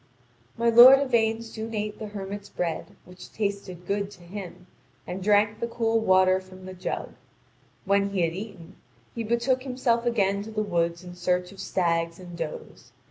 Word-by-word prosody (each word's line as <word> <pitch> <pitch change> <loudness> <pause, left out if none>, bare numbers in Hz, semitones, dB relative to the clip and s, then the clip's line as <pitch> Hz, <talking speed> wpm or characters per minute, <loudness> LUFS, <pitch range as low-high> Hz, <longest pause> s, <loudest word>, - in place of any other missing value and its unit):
My 235 0 +3
lord 245 +4 +10
Yvain 230 -4 +1
soon 225 0 -6
ate 210 0 -3
the 215 - -5
hermit's 200 0 -7
bread, 170 -2 -4
which 180 0 -13
tasted 200 -4 -4
good 200 +1 -1
to 180 -3 -15
him, 180 0 -9 0.4
and 185 +2 -5
drank 210 +2 +3
the 235 - -2
cool 225 -1 +1
water 185 -3 +4
from 185 0 -14
the 185 - -7
jar. 185 0 -4 0.8
When 200 0 +2
he 195 -2 -1
had 165 -1 +1
eaten, 190 -3 -9 0.4
he 230 - -3
betook 235 +3 +1
himself 250 -2 0
again 200 -4 +1
to 210 - -8
the 215 -1 -1
woods 170 -3 -1
in 180 -1 -9
search 180 +1 -1
of 195 - -14
stags 170 -2 0
and 175 -2 -10
does. 165 -2 -7
200 Hz, 175 wpm, -26 LUFS, 180-225 Hz, 0.8 s, lord